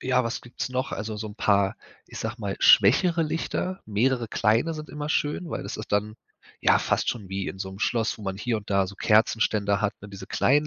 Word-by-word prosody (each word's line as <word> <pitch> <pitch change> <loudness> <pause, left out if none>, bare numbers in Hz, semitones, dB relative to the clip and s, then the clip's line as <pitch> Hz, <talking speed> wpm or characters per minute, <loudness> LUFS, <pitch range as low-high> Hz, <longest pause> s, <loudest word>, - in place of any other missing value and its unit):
ja, 130 -1 +1
was 115 - -3
gibt's 120 +1 -5
noch? 130 +1 -2
Also, 110 0 -4
so 110 0 -5
'n 105 - -11
paar, 100 -2 +2 0.3
ich - - -9
sage 110 +1 -3
mal 100 -2 -3
schwächere 165 - +5
Lichter, 165 +4 -2
mehrere 120 +3 +1
kleine 115 +10 +1
sind 155 0 -7
immer 150 0 -5
schön, 155 +3 -1
weil - - -4
das - - -6
ist 110 - -8
dann 105 +2 0 0.4
ja - - +5
fast - - 0
schon 105 -6 -7
wie 95 0 -3
in 95 - -6
so 95 - -3
'nem 95 - -10
Schloss, 115 0 0
wo - - -10
man 95 -1 -3
hier 115 +2 -1
und 105 -1 -8
da 100 -1 +2
so 100 - -10
Kerzenständer 105 -2 +2
hat, 105 -1 +1
ne, 100 - -9
diese 100 0 -9
kleinen 150 +3 +2
110 Hz, 230 wpm, -26 LUFS, 100-130 Hz, 0.4 s, schwächere